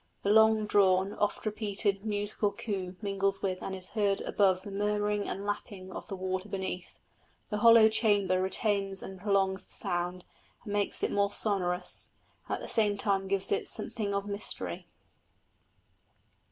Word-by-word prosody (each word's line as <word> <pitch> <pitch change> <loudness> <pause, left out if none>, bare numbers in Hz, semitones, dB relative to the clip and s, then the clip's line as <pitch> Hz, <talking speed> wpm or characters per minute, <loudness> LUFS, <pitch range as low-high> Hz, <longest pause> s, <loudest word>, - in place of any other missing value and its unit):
The 200 - +2
long 220 0 +5
drawn, 195 -1 +3
oft 210 - -1
repeated 205 -2 -1
musical 205 -1 -1
coo 190 -5 -4
mingles 195 -1 0
with 185 -2 -1
and 190 - -4
is 185 -1 -6
heard 205 -3 +1
above 190 -2 +2
the 205 - -7
murmuring 210 0 0
and 200 +2 -4
lapping 200 -2 -5
of - - -7
the 195 - -5
water 185 +1 -3
beneath; 190 -2 -4 0.5
the 210 - -1
hollow 230 0 +8
chamber 205 -4 +2
retains 195 0 0
and 190 -1 -8
prolongs 195 -1 +1
the - - -12
sound, 175 +1 -2 0.4
and 205 -3 -5
makes 205 -1 0
it - - +1
more 200 0 +2
sonorous, 180 -4 -1 0.3
and - - -1
at - - -8
the - - -6
same 210 -2 +2
time 195 -1 0
gives 195 0 +1
it 200 - 0
something 215 -3 -3
of 200 0 -1
mystery. 205 +1 -4
200 Hz, 160 wpm, -30 LUFS, 190-210 Hz, 0.5 s, hollow